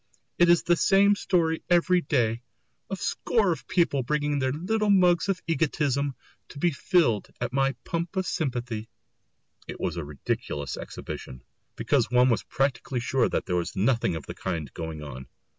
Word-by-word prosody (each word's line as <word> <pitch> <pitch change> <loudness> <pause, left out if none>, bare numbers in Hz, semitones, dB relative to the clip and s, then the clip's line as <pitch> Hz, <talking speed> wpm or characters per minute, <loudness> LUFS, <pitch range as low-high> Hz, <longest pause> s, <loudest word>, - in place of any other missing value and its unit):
"It 175 0 +6
is 175 0 +5
the 175 - +3
same 195 +3 +4
story 165 -5 +1
every 175 +1 +4
day 120 -6 0 0.5
a 195 - -2
score 200 +1 +1
of 165 - -5
people 170 -6 +2
bringing 145 +2 0
their 130 -1 +1
little 205 +9 0
mugs 180 -2 +4
of 185 -2 -1
egotism 145 -4 0 0.3
to - - -11
be 175 +4 +2
filled 145 - +2
at 125 0 -3
my 135 0 +2
pump 170 +2 -3
of 190 -1 0
sympathy!" 120 -9 -3 0.8
It - - -7
was 85 -1 -2
a 85 - -3
ridiculous 70 0 -4
exhibition, 65 -1 -8 0.3
because - - +1
one 125 +1 +4
was 115 -5 +2
practically 135 -1 -1
sure 125 +1 +1
that - - -1
there 90 - -1
was 85 - -3
nothing 115 -2 +1
of 80 - -6
the - - -6
kind 80 -7 -4
going 80 -2 -6
on. 65 -3 -8
140 Hz, 170 wpm, -26 LUFS, 115-175 Hz, 0.8 s, It